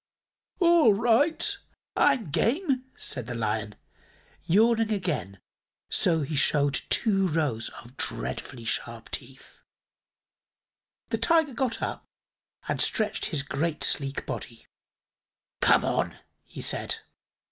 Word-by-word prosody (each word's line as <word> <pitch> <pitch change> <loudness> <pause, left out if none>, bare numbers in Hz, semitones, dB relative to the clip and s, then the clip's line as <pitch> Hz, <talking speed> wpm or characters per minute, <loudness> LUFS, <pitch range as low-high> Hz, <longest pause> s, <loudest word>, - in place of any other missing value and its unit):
"All 340 - +5
right; 290 - +2 0.4
I'm 215 - +2
game," 260 - 0
said 125 -4 +1
the 120 - -4
Lion, 110 -2 -2 0.7
yawning 225 +4 +3
again 160 - -2 0.5
so 165 -3 +3
that 140 - -4
he 155 - -2
showed 145 0 +3 0.2
two 195 -4 +2
rows 145 -9 -1
of 120 +3 -17
dreadfully 90 - -3
sharp 115 +1 -3
teeth. 135 0 -8 1.5
The - - -1
Tiger 320 -4 +3
got 245 -1 -2
up - - -4 0.6
and - - 0
stretched 215 -4 +1
his 145 -4 0
great, 150 +3 -2
sleek 140 -1 +1
body. 115 -1 -7 1.0
"Come - - +5
on," - - -1 0.3
he - - -9
said. - - +1
165 Hz, 115 wpm, -27 LUFS, -, 1.5 s, All